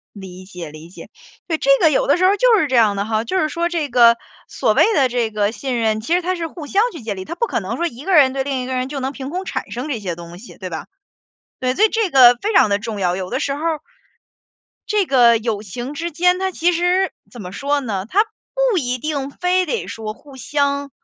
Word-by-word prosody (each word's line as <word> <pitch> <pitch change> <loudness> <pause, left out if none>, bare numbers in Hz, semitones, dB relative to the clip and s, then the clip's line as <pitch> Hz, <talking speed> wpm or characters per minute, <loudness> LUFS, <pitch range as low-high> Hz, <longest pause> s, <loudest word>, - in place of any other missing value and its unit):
理 185 -2 -10
解， 180 -4 -9
理 155 +2 -12
解。 175 - -12 0.4
对， 330 - 0
这 275 - 0
个 320 - +5
有 280 - +1
的 285 - +4
时 365 - +1
候 390 +2 +4
就 470 0 +4
是 315 - +2
这 260 - -3
样 215 -4 +4
的 200 - -1
哈， 220 +1 -1
就 375 +11 -1
是 310 - +1
说 340 +2 -1
这 330 -4 -2
个 235 -2 +6 0.3
所 - - +1
谓 - - +5
的 270 -6 +3
这 240 -2 -1
个 210 -1 0
信 255 0 -3
任， 220 -1 +1
其 280 +10 -1
实 360 - +1
它 365 +2 -1
是 340 -2 -3
互 315 -1 -9
相 395 +8 +2
去 330 - -9
建 215 -3 -4
立， 190 - -6
他 335 - -6
不 470 - -1
可 - - -2
能 - - -4
说 345 - -1
一 275 -3 -7
个 385 - +1
人 275 -5 +6
对 270 0 -1
另 270 -2 -2
一 - - -5
个 260 - -3
人， 255 0 -2
就 280 0 -5
能 265 +1 -3
凭 270 -1 -7
空 365 +4 -4
产 275 -7 -5
生 250 +5 -5
这 250 -7 -3
些 185 -4 -4
东 170 0 -10
西， 235 - -13
对 185 - -6
吧？ 160 -2 -6 0.7
对， 255 0 0
所 425 - +5
以 - - +2
这 445 -3 0
个 250 -4 +7
非 430 +2 -1
常 215 - +5
的 200 0 +1
重 215 -1 -5
要。 180 -2 +1
有 185 -1 -5
的 - - -2
时 275 - -1
候 285 - -6 1.3
这 420 -2 +2
个 240 -5 +5
友 220 -2 -3
情 240 +7 -6
之 335 +3 -4
间 360 +3 +2
它 380 0 -1
其 350 -1 +1
实 355 +2 +1 0.2
怎 240 - -10
么 180 -1 -8
说 285 +6 -1
呢， 205 -7 -4
它 410 - +3 0.5
不 385 - +2
一 255 -4 -2
定 285 0 -3
非 360 +4 0
得 300 - -2
说 220 -1 -6
互 280 +3 -16
相 280 +1 -1
270 Hz, 280 characters per minute, -19 LUFS, 220-335 Hz, 1.3 s, 个